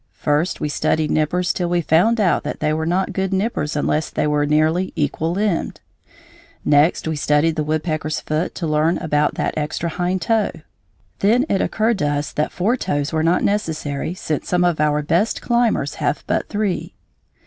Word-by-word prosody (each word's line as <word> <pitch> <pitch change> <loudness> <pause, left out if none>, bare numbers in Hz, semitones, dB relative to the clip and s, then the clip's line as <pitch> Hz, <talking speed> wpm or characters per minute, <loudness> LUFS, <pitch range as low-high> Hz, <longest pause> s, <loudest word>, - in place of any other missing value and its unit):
First 150 +4 0
we - - -1
studied 155 +1 0
nippers 175 +4 +1
till 175 -2 -2
we 175 0 +1
found 180 +9 +3
out 190 -5 +2
that - - -5
they 155 - +1
were 160 +1 -1
not 185 +3 0
good 190 0 -1
nippers 190 -6 -1
unless 150 +1 0
they - - -1
were 150 -1 +1
nearly 155 +5 +1
equal 155 +3 -1
limbed. 195 -1 -1 0.9
Next 150 +3 +3
we 160 - -1
studied 150 +2 +2
the 155 - -1
woodpecker's 155 0 -2
foot 155 +3 -2
to 175 - -3
learn 155 +2 +2
about 150 -1 0
that - - -1
extra 155 +2 -2
hind 180 +2 -1
toe. 225 -2 +2 0.7
Then 235 +7 +3
it 195 - +1
occurred 220 -1 0
to 145 - +1
us 145 0 -1
that 150 - -1
four 205 +7 +1
toes 145 - -2
were 160 - +1
not 170 +3 +2
necessary, 160 -6 -2
since 155 -5 -3
some 180 0 +2
of 175 -3 +1
our 150 0 +2
best 170 +9 +1
climbers 235 - +1
have - - 0
but - - -1
three. 205 -3 -2
160 Hz, 180 wpm, -20 LUFS, 150-185 Hz, 0.9 s, found